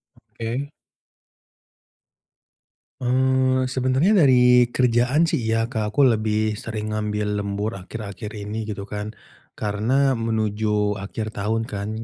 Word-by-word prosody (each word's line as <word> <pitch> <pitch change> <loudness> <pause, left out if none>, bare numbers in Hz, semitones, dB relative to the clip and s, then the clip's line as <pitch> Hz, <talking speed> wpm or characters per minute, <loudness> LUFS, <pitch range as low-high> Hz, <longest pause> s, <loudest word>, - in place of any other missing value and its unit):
Oke. 120 +5 -5 2.3
Eee, 130 0 +2
sebenarnya 135 +9 +3
dari 125 -2 +5
kerjaan, 125 +3 +2
sih, 160 - +1
iya, 115 +1 0
Kak. 110 -4 -2
Aku 145 - +3
lebih 110 -4 +2
sering 110 -1 -5
ngambil 105 -1 -2
lembur, 100 +1 -3
akhir-akhir 105 +2 -7
ini, 105 +1 -5
gitu 100 -1 -6
kan. 105 +1 -5 0.4
Karena, 120 +6 +1
menuju 105 -2 0
akhir 110 +3 -5
tahun, 110 +2 -2
kan, 100 0 -4
110 Hz, 110 wpm, -23 LUFS, 105-125 Hz, 2.3 s, dari